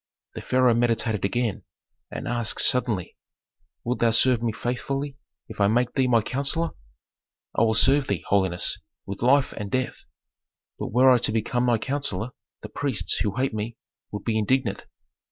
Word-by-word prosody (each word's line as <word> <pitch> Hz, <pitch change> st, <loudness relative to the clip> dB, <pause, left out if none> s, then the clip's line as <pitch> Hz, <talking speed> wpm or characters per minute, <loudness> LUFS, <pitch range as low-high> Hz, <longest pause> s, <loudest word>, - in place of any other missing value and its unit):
The -, -, -7 dB
pharaoh 125 Hz, -1 st, +3 dB
meditated 115 Hz, -3 st, 0 dB
again, 115 Hz, +1 st, -1 dB, 0.5 s
and -, -, -6 dB
asked 120 Hz, -2 st, -1 dB
suddenly, 115 Hz, -8 st, 0 dB, 0.7 s
"Wilt 125 Hz, +2 st, -2 dB
thou 115 Hz, -, +4 dB
serve 115 Hz, +1 st, +4 dB
me 115 Hz, -1 st, 0 dB
faithfully 135 Hz, +5 st, -3 dB, 0.3 s
if -, -, -6 dB
I 100 Hz, -, +5 dB
make 125 Hz, +3 st, +1 dB
thee 130 Hz, -2 st, +2 dB
my 115 Hz, -3 st, +3 dB
counsellor?" 140 Hz, +7 st, -1 dB, 0.8 s
"I -, -, +2 dB
will 110 Hz, -1 st, +3 dB
serve 135 Hz, +4 st, +4 dB
thee, 100 Hz, -4 st, -2 dB
holiness, 95 Hz, -3 st, +1 dB, 0.3 s
with 100 Hz, 0 st, -7 dB
life 130 Hz, +3 st, +3 dB
and 105 Hz, -2 st, -6 dB
death. 130 Hz, +3 st, -3 dB, 0.7 s
But -, -, -3 dB
were 130 Hz, +4 st, +6 dB
I 125 Hz, -, +5 dB
to 110 Hz, -, 0 dB
become 120 Hz, +3 st, 0 dB
thy 120 Hz, -1 st, +3 dB
counsellor, 125 Hz, -4 st, -3 dB, 0.3 s
the -, -, -7 dB
priests, 140 Hz, -6 st, -1 dB
who 105 Hz, -2 st, -1 dB
hate 130 Hz, -1 st, 0 dB
me, 110 Hz, +2 st, -4 dB, 0.3 s
would 105 Hz, -1 st, -6 dB
be 110 Hz, -1 st, 0 dB
indignant." 115 Hz, -1 st, 0 dB
120 Hz, 165 wpm, -25 LUFS, 110-130 Hz, 0.8 s, were